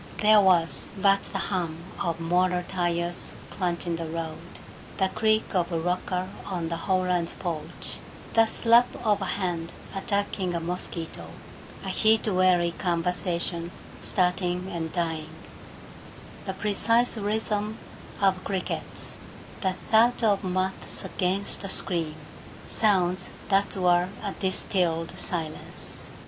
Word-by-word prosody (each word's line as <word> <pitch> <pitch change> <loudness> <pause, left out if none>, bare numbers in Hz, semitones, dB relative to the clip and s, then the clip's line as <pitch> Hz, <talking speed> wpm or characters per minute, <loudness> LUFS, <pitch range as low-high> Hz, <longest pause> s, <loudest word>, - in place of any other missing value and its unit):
There 210 0 +7
was 175 -4 +3
but 195 0 +4
the 195 - -4 0.2
hum 170 -4 -1 0.2
of 165 -1 -1
motor 180 +1 +2
tires 175 -1 -1 0.2
crunching 175 -2 -1
the 165 -1 -4
road, 160 -1 -4 0.6
the 190 -1 +2
creak 215 +2 +1
of 180 -1 +1
a 165 - 0
rocker 180 +2 -1 0.2
on 175 -4 -3
the 170 - -1
Howlands' 180 -1 +1
porch, 165 -4 -3 0.3
the 225 0 +6
slap 235 +2 +5 0.2
of 210 -2 +3
a - - 0
hand 175 -4 -2 0.2
attacking 195 -2 -1
a - - +1
mosquito, 170 -1 -4 0.6
a - - -2
heat 220 0 +3
weary 185 -3 +4
conversation 170 -1 -1 0.3
starting 180 0 0
and 165 -2 -3
dying, 160 -3 -2 1.2
the 190 - -2
precise 230 +5 +2
rhythm 215 0 -1 0.4
of 190 -2 +3
crickets, 190 -2 -3 0.4
the 190 -2 +1 0.2
thud 235 +2 +5
of 205 -3 +3
moths 185 +1 -2
against 190 +2 0
the 195 - -4
screen 165 -5 +1 0.5
sounds 185 -4 +2 0.2
that 200 +1 +2
were 180 -1 +3
a 200 - -2
distilled 180 -3 0
silence. 160 -3 -3
185 Hz, 120 wpm, -27 LUFS, 170-200 Hz, 1.2 s, There